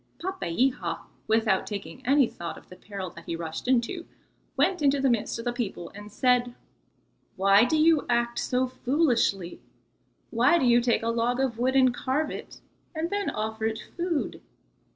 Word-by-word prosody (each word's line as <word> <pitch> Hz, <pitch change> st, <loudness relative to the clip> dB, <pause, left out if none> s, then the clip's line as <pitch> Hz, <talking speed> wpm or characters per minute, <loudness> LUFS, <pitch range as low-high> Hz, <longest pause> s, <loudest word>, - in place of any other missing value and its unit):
Papeiha, 250 Hz, -, -1 dB, 0.3 s
without 220 Hz, -3 st, +2 dB
taking 210 Hz, +5 st, -7 dB
any 275 Hz, 0 st, +5 dB
thought 170 Hz, -5 st, -7 dB
of -, -, -16 dB
the 180 Hz, -, -11 dB
peril 190 Hz, -1 st, -7 dB
that -, -, -13 dB
he 165 Hz, -, -3 dB
rushed 165 Hz, +5 st, -6 dB
into, 260 Hz, +8 st, 0 dB, 0.5 s
went 370 Hz, -4 st, +2 dB
into 280 Hz, -1 st, +3 dB
the 270 Hz, -1 st, +3 dB
midst 235 Hz, -1 st, -1 dB
of 230 Hz, -, -7 dB
the 240 Hz, -, 0 dB
people 200 Hz, -8 st, -4 dB
and 205 Hz, +1 st, -10 dB
said: 245 Hz, +2 st, +2 dB, 0.8 s
"Why 195 Hz, +3 st, +5 dB
do 310 Hz, +5 st, +1 dB
you 315 Hz, -1 st, +4 dB
act 235 Hz, 0 st, +1 dB
so 255 Hz, +1 st, +1 dB
foolishly? 250 Hz, -, 0 dB, 0.7 s
Why 250 Hz, +9 st, +4 dB
do 270 Hz, -, +1 dB
you 240 Hz, 0 st, +5 dB
take 235 Hz, -2 st, +1 dB
a 230 Hz, -, 0 dB
log 235 Hz, +2 st, 0 dB
of 255 Hz, -4 st, -1 dB
wood 260 Hz, +2 st, +1 dB
and 255 Hz, -2 st, +5 dB
carve 275 Hz, +5 st, -1 dB
it, -, -, -9 dB, 0.3 s
and 320 Hz, +2 st, -2 dB
then 405 Hz, 0 st, -1 dB
offer 220 Hz, +1 st, -3 dB
it 220 Hz, 0 st, -3 dB, 0.2 s
food? 345 Hz, -3 st, -2 dB
240 Hz, 175 wpm, -27 LUFS, 215-270 Hz, 0.8 s, any